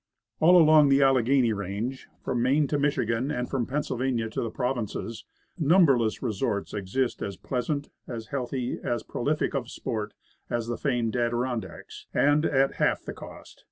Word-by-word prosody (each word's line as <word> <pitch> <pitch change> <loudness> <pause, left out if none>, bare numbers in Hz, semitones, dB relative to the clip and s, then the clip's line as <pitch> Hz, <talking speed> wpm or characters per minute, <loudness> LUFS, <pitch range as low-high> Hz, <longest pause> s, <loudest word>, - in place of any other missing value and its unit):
All 175 +3 +7
along 155 -2 +6
the 135 +1 +5
Alleghany 130 -2 +3
range, 105 +6 -4 0.2
from 125 -2 -1
Maine 140 +5 +3
to 145 - 0
Mich 145 0 +1
igan, 115 +5 0
and 125 -4 -2
from 125 -4 -2
Pennsylvania 130 -4 -1
to - - -2
the 115 - -2
Provinces, 115 -2 -3 0.3
num 170 +4 +5
berless 120 -6 +1
resorts 100 -3 -2
exist 105 +6 -2
as 100 -2 -4
pleasant, 135 - -3 0.2
as 115 -3 -6
healthy, 130 -1 -3
as 120 -1 -1
prolific 150 +6 -1
of 130 -4 -3
sport, 105 -4 -4 0.3
as 120 -1 -1
the 120 0 -3
famed 120 -5 0
Adirondacks, 120 0 -3
and 145 +2 +3
at 135 -1 +1
half - - +1
the - - -5
cost. - - -12
125 Hz, 160 wpm, -27 LUFS, 115-140 Hz, 0.3 s, All